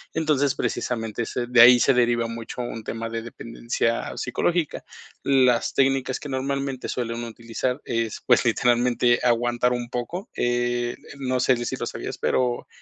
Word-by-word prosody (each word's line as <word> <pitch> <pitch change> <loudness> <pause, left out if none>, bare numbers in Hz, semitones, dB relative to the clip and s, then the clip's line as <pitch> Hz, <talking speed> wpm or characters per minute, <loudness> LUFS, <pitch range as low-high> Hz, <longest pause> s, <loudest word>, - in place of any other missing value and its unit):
Entonces, 145 -4 +1
precisamente 115 -2 -2
ese 120 +1 -3
de 125 -1 +6
ahí 125 +1 +9
se 135 - +4
deriva 120 -1 +2
mucho 115 +1 -6
un 115 -2 -6
tema 115 0 -4
de 115 0 -4
dependencia 115 0 -3
psicológica. 165 +5 -1 0.4
Las 130 -3 +3
técnicas 135 -1 +1
que 145 - -8
normalmente 135 0 -3
suelen 120 -1 -3
utilizar 115 +3 -3
es, 115 -2 -2
pues, - - +4
literalmente 120 0 +2
aguantar 120 +1 +2
un 120 -1 -4
poco, 165 - -5
eh, 120 0 0 0.2
no 130 -2 -1
sé 130 0 +4
si - - -2
lo - - -4
sabías, - - -6
pero 125 -1 0
120 Hz, 150 wpm, -24 LUFS, 115-130 Hz, 0.4 s, ahí